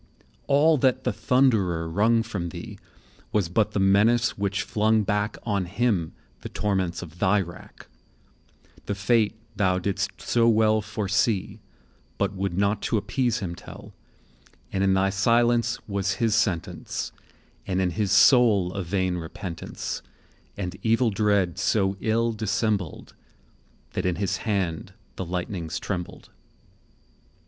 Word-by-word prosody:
All 150 +2 +4
that 130 -1 +2
the - - 0
Thunderer 105 -7 +2
wrung 110 +7 +2
from 100 -6 -4
thee - - -9 0.5
Was 100 -6 +1
but 105 +4 +1
the - - 0
menace 105 +5 +3
which 100 -1 -1
flung 110 0 +2
back 105 +1 -1
On 100 -4 -1
him 100 -3 0 0.3
the - - -8
torments 95 -4 -1
of 85 0 -12
thy 105 +1 +3
rack; 85 -3 -8 1.0
The 100 - -1
fate 110 +2 +2 0.2
thou 95 -3 +2
didst 95 +2 -2
so 115 -1 +2
well 110 -1 +3
foresee, 105 -1 -1 0.6
But 100 0 0
would 95 -2 -3
not 100 +1 +1
to 115 - 0
appease 120 +3 -1
him 90 -3 -3
tell;30 - - -11 0.8
And 95 - +1
in 95 -1 +3
thy 95 +1 +2
Silence 115 +4 +2
was 100 -1 -1
his 115 -3 0
Sentence, 105 -7 -1 0.6
And 95 -1 0
in 90 -2 +1
his 105 0 -1
Soul 100 -3 +5
a 100 - -3
vain 95 0 -1
repentance, 85 +1 -6 0.6
And 90 -2 -4
evil 115 +1 +2
dread 100 -4 +1
so 95 -2 +1
ill 115 +1 +1
dissembled, 105 -4 -2 0.8
That - - -1
in 90 - 0
his 100 +2 -1
hand 95 -4 -2 0.2
the 95 - -4
lightnings 90 -1 -4
trembled. 90 -3 -5
100 Hz, 135 wpm, -25 LUFS, 95-110 Hz, 1.0 s, Soul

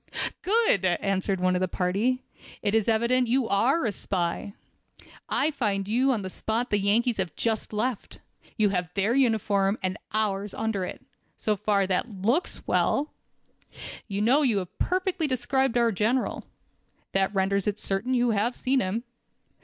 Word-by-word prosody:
"Good!" 425 - +2
answered 190 +1 0
one 185 0 +2
of - - +1
the 185 - +1
party, 205 +9 0 0.4
"it 205 -1 +1
is 220 -2 +2
evident 235 +3 +2
you 250 0 +2
are 250 +10 +2
a 220 - +1
spy. 185 0 -2 0.8
I 310 - +2
find 205 -8 -1
you 250 +5 +2
on 220 -6 -1
the 190 - -4
spot 230 +6 -2
the 205 - +3
Yankees 225 +4 +2
have 190 -3 -3
just 225 -2 -1
left. 220 +2 -3 0.4
You 215 -2 +3
have 180 -3 -2
their 200 +4 +2
uniform 215 -6 +2
on 185 - +1
and 185 - -8
ours 205 -2 -1
under 220 -4 -1
it. - - -8 0.3
So 215 - 0
far 200 0 +1
that 190 +5 -1
looks 255 - 0
well. 295 +2 +1 1.0
You 200 -1 -2
know 260 +7 +4
and 275 - +3
have 185 -3 -4
perfectly 370 -3 0
described 260 0 +1
our 235 -1 +3
General. 225 +6 0 0.7
That 195 0 +1
renders 195 +1 +1
it 210 0 0
certain 215 +6 -1
you 245 -1 +2
have 220 +4 0
seen 265 +1 +1
him. 215 +2 -2
215 Hz, 165 wpm, -26 LUFS, 195-250 Hz, 1.0 s, know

